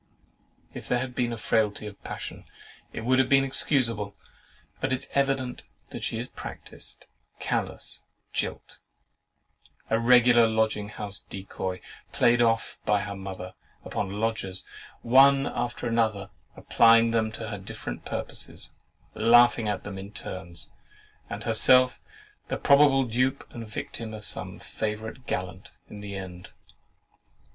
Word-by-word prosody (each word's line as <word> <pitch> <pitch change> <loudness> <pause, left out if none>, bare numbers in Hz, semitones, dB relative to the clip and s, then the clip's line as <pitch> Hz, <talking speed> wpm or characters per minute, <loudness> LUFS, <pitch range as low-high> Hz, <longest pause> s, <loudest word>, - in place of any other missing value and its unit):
If - - -7
there 125 - +2
had 125 0 -3
been 125 -1 0
the 115 - -4
frailty 105 -1 +1
of 105 -1 -10
passion, - - -6 0.5
it - - -5
would 130 +3 +3
have 130 - +3
been 135 0 +5
excusable; 115 -7 +1 0.6
but 135 - -1
it 130 - 0
is - - -6
evident 135 -2 0 0.4
she - - -3
is - - -3
a - - -18
practised, - - -9 0.3
callous - - -3 0.3
jilt, - - -3 1.1
a 110 - +3
regular 120 -1 +6
lodging 110 -2 0
house 105 -1 -5
decoy, 95 -1 -5 0.3
played 120 0 +4
off 115 -1 +1
by 105 -1 +2
her 100 0 -5
mother 95 -1 -7 0.3
upon 100 - -2
the 95 - -6
lodgers, 105 -4 -2 0.4
one 135 +3 +6
after 120 -1 -3
another, 110 -4 0 0.3
applying 115 0 +5
them 110 -1 +1
to 110 0 -5
her 105 -2 -5
different 75 -9 -7
purposes, - - -6 0.4
laughing 120 0 +5
at 105 - -2
them 95 -1 -6
in 100 +1 -8
turns, 85 -4 -7 0.6
and - - -5
herself 130 -1 +5 0.5
the - - -2
probable 140 -1 +5
dupe 130 +3 0
and 115 -2 -7
victim 110 +1 -6
of 105 -1 -8
some 95 -2 0
favourite 110 +3 -5
gallant 90 +1 -4 0.2
in 105 - -8
the 100 -1 -6
end. 95 -2 -8
110 Hz, 140 wpm, -27 LUFS, 100-125 Hz, 1.1 s, regular